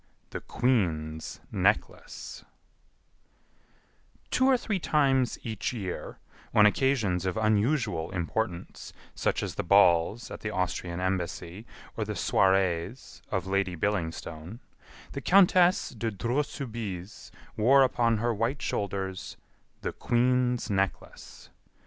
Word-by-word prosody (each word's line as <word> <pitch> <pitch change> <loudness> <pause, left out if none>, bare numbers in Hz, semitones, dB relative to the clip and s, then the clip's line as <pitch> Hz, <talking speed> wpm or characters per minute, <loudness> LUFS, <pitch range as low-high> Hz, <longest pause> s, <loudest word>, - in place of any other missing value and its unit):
The - - -5
Queen's 80 -11 -1
Necklace - - -1 1.9
Two 260 - +3
or 265 -1 +5
three 215 -5 -2
times 135 -6 +2
each 110 0 -3
year, 95 -7 -5 0.4
on 105 - +7
occasions 105 -6 +2
of 90 - -2
unusual 110 - +1
importance, 90 0 -4 0.2
such - - -1
as - - -3
the - - -3
balls 90 +3 +4
at - - -6
the 105 - -4
Austrian 90 -2 -2
Embassy 90 +1 -3 0.3
or - - -1
the - - -4
soirées 95 +3 +1
of - - -1
Lady 95 -1 0
Billingstone, 85 0 -3 0.5
the 140 - -5
Countess 180 +1 +5
de 115 -1 -3
Dreux 115 +7 0
Soubise 110 -9 -6 0.3
wore 135 +5 +5
upon 115 -3 +2
her 120 +2 0
white 115 +6 -1
shoulders 95 -1 -3 0.4
"The - - -3
Queen's 125 0 +1
Necklace." 95 -1 -3
105 Hz, 110 wpm, -28 LUFS, 90-125 Hz, 1.9 s, on